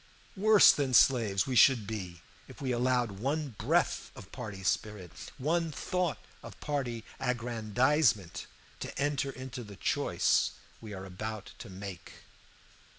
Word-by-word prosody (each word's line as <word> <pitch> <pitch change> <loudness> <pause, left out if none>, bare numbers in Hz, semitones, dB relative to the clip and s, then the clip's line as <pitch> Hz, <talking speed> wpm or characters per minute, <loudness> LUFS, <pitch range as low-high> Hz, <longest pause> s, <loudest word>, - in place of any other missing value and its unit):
Worse 210 +1 +7
than 135 -3 0
slaves 110 -8 +4
we 130 - -2
should 120 -3 +6
be 95 -5 -6 0.2
if - - -13
we 130 -2 -2
allowed 125 -1 +1
one 145 +5 -1
breath - - +1
of 95 - -12
party 105 -6 -7
spirit, 95 -2 -2 0.3
one 165 +4 0
thought 175 - -1 0.2
of - - -11
party 125 -6 -3 0.2
aggrandizement, 120 - +1 0.3
to - - -6
enter 140 -1 0
into 130 -2 -7
the 105 -2 -11
choice - - +1 0.3
we 110 - -9
are 95 -1 -7
about 105 +3 -6
to 115 -2 -9
make. 95 -1 -8
120 Hz, 135 wpm, -30 LUFS, 105-135 Hz, 0.3 s, Worse